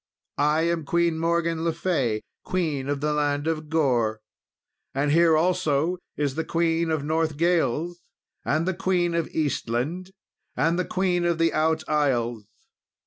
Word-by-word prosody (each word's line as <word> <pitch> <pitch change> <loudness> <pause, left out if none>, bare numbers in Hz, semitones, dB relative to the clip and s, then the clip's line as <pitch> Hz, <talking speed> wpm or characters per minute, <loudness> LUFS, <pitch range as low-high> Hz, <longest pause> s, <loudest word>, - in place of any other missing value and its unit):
I 150 +2 +3
am 170 -1 0
Queen 170 +2 +1
Morgan 165 0 0
le 165 - +1
Fay, 145 -10 -1 0.2
Queen 155 -7 -2
of 145 -1 -1
the 150 0 0
land 145 -1 0
of 155 -1 -2
Gore, 120 -9 +1 0.8
and 145 +1 +1
here 165 0 +5
also 165 0 +1 0.2
is 145 -2 0
the 160 - -2
Queen 165 0 0
of 155 -3 0
Northgales, 160 0 0 0.5
and 155 +4 0
the 185 - +1
Queen 175 -1 0
of 170 -1 0
Eastland, 150 +4 -2 0.5
and 165 +2 +2
the 180 - 0
Queen 180 -2 0
of 170 -1 +1
the 165 0 +2
Out 160 +1 +1
Isles. 120 -7 0
160 Hz, 145 wpm, -25 LUFS, 145-170 Hz, 0.8 s, here